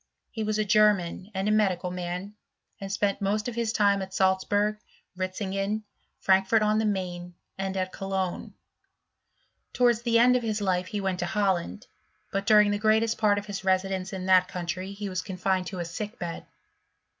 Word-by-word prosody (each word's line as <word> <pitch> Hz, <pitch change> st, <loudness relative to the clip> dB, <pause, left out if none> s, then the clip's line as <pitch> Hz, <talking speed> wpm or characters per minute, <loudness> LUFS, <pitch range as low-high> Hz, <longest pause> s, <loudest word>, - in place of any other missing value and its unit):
He 220 Hz, -, -3 dB
was 215 Hz, 0 st, -1 dB
a 215 Hz, -, +1 dB
German 205 Hz, -3 st, +2 dB
and 190 Hz, +2 st, -1 dB
a -, -, +3 dB
medical 190 Hz, -4 st, +1 dB
man, 180 Hz, +2 st, -5 dB, 0.5 s
spent 200 Hz, 0 st, -1 dB
most 210 Hz, +2 st, 0 dB
of 245 Hz, -, -3 dB
his 230 Hz, -1 st, -1 dB
time 200 Hz, -3 st, +3 dB
at 190 Hz, 0 st, -7 dB
Salzburg, 205 Hz, +3 st, +1 dB, 0.4 s
Ritzingen, 195 Hz, +3 st, -2 dB, 0.4 s
Fi 190 Hz, 0 st, +4 dB
fort 215 Hz, +3 st, +2 dB
on 215 Hz, 0 st, +2 dB
the 220 Hz, -, +1 dB
Maine, 180 Hz, -3 st, -3 dB, 0.2 s
and 195 Hz, 0 st, -3 dB
at 185 Hz, 0 st, -1 dB
Cologne. 190 Hz, -2 st, -3 dB, 1.2 s
Towards 240 Hz, -2 st, +3 dB
of 240 Hz, +1 st, +4 dB
his 220 Hz, -2 st, -2 dB
life 185 Hz, -2 st, 0 dB
he 210 Hz, -, -3 dB
went 190 Hz, -2 st, -1 dB
to 175 Hz, -, -1 dB
Holland, 190 Hz, -, -1 dB, 0.5 s
but 195 Hz, +1 st, -2 dB
during 210 Hz, -1 st, +6 dB
the 220 Hz, +2 st, +2 dB
part 210 Hz, -2 st, +2 dB
of 205 Hz, -, -3 dB
his 195 Hz, -2 st, -6 dB
residence 190 Hz, 0 st, 0 dB
in 185 Hz, -1 st, -5 dB
that 185 Hz, -1 st, +5 dB
country 185 Hz, +2 st, -4 dB
he 205 Hz, 0 st, -5 dB
was 185 Hz, -2 st, -2 dB
coni 190 Hz, 0 st, -1 dB
to 190 Hz, -, -6 dB
a 175 Hz, -, -3 dB
sick 210 Hz, +6 st, -6 dB
bed. 170 Hz, -2 st, -6 dB
195 Hz, 170 wpm, -27 LUFS, 185-210 Hz, 1.2 s, during